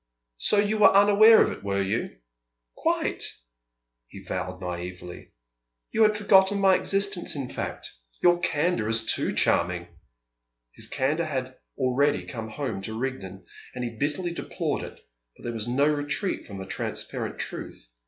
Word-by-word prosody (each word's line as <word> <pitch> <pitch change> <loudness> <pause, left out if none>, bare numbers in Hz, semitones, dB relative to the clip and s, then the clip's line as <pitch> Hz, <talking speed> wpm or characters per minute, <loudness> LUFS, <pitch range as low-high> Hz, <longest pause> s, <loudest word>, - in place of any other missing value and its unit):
"So 210 - +4
you 210 +1 +2
were 210 - +8
unaware 205 +3 +7
of - - -1
it, - - -9
were 100 0 0
you?" 105 +5 -2 0.6
"Quite!" - - 0 0.8
he - - -12
vowed 90 0 -4
naïvely. 90 -1 -7 0.6
"You 225 - 0
had 215 -1 +5
forgotten 200 -1 +4
my 195 -1 +5
existence, 195 -3 0
in 135 -3 -5
fact? - - -5 0.3
Your 175 0 +4
candour 150 -8 0
is 115 0 +1
too - - +1
charming!" 85 0 +1 0.9
His - - -4
candour 155 +5 0
had 130 -3 -4 0.2
already 140 +2 +1
come 115 -4 -6
home 115 -5 -4
to 110 +3 -5
Rigden, 105 -7 -5 0.3
and 125 - -4
he 120 -1 -4
bitterly 150 +8 -2
deplored 170 - -3
it, - - -9 0.4
but - - -17
there 120 - -4
was 110 -1 -3
no 130 +4 +2
retreat 150 +6 -1
from 100 -3 -8
the 95 - -6
transparent - - -4
truth. - - -7
135 Hz, 155 wpm, -26 LUFS, -, 0.9 s, were